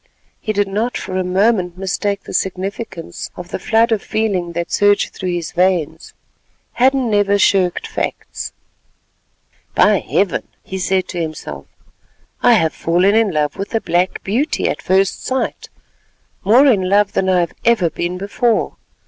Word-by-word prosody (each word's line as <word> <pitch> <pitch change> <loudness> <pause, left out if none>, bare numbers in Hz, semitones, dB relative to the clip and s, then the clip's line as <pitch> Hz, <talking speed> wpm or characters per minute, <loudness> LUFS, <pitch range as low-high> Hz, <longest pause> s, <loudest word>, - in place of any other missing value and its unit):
He 215 - -2
did 205 -1 +1
not 215 +5 -1
for 185 - -5
a 185 - 0
moment 185 -1 +1
mistake 200 +1 -2
the - - -9
significance 190 -1 -4
of 175 -1 -9
the - - -4
flood 225 +4 +2
of 220 -3 +1
feeling 200 -6 -1
that 170 0 -3
surged 205 0 +2
through 185 - -4
his 175 -2 -3
veins. 175 -3 0 0.6
Hadden 260 -1 +2
never 205 -1 +3
shirked 190 -2 +2
facts. - - -4 1.2
"By - - +5
Heaven!" - - -1 0.2
he 190 - -6
said 185 0 0
to 175 - -3
himself, 150 - -6 0.7
"I - - +6
have 160 -1 +2
fallen 180 +4 +2
in 225 -1 +3
love 150 -2 -1
with 200 +3 -4
a 225 - +1
black 175 +2 0
beauty 245 +10 0
at - - -2
first 190 +1 +1
sight—more 255 -2 -1
in 200 -9 +3
love 205 +1 +3
than 190 - +1
I 180 -1 +3
have 170 - -3
ever 210 -8 +3
been 175 +3 -3
before. 215 +4 0
190 Hz, 155 wpm, -18 LUFS, 180-215 Hz, 1.2 s, I